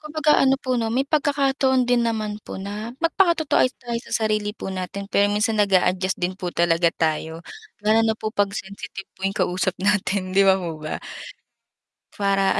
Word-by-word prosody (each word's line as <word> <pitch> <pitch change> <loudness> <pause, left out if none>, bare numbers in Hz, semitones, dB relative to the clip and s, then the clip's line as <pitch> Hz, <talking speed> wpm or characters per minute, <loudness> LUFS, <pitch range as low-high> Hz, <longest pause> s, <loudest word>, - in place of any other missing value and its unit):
Kumbaga 305 0 +2
ano 270 0 +4
po 255 -3 -1
'no, 225 - -1
may 255 +4 +1
pagkakataon 275 -3 +2
din 245 0 +2
naman 215 -2 -3
po - - -8
na 210 +5 -6
magpakatotoo 335 -3 +2
ay - - +5
tayo 235 -2 -4
sa 220 - 0
sarili 210 0 -1
po 190 - -5
natin 190 +2 -5
pero 205 0 +4
minsan 210 +1 +1
nag-a-adjust 185 -1 +2
din 180 +1 -1
po 180 - -2
talaga 170 0 +2
tayo, 160 0 -2 0.4
lalo 220 +1 +4
na 220 -1 +1
po 215 0 -4
'pag 205 -3 +2
sensitive 195 0 -7
po 190 +1 -2
yung 195 - -7
kausap 180 0 0
natin 195 -1 0
'di 195 - +4
ba 195 -1 +5
po 170 -4 -5
ba? 155 0 -4 1.2
Para, 195 -1 +2
205 Hz, 180 wpm, -23 LUFS, 190-240 Hz, 1.2 s, ay